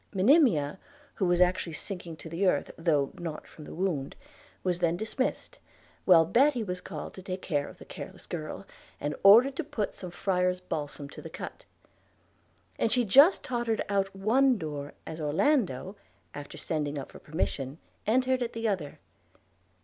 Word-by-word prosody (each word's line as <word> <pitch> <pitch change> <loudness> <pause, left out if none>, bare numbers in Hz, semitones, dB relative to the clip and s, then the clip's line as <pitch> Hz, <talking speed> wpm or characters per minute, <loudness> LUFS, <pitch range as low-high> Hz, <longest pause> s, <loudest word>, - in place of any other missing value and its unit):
Monimia, 190 - +4 0.3
who 190 - 0
was 175 0 +3
actually 180 -2 +2
sinking 175 -1 -6
to 160 - -10
the 170 +4 0
earth, - - +1
though 150 -5 +1
not 165 -3 -5
from 155 - -13
the - - -9
wound, 160 -7 -2 0.5
was 180 -2 0
then 170 -1 +1
dismissed, 220 +6 -3 0.5
while 165 -3 +7
Betty 250 - +3
was 180 -3 -4
called 155 -5 -7
to 190 - -10
take 185 0 -5
care 145 -5 0
of - - -13
the - - -12
careless - - -9
girl, - - -6 0.3
and 145 +1 -2
ordered 235 +7 +7
to 335 - -1
put 220 -8 -3
some 180 - -7
friar's 180 0 0
balsam 150 -5 -5
to - - -10
the - - -8
cut; - - -8 1.1
and 225 - +2
she 245 -1 +3
just 280 - +6
tottered 240 -3 -1
out 195 -1 +2
of 195 - -20
one 250 +5 +4
door 145 -4 -5
as 160 0 -6
Orlando, 185 - +1 0.4
after 145 -1 -8
sending 150 -2 -2
up 135 - -6
for - - -12
permission, 150 -3 -3 0.3
entered 255 +3 +2
at 240 -1 -2
the 230 0 -2
other. 160 -8 -2
180 Hz, 170 wpm, -29 LUFS, 155-225 Hz, 1.1 s, while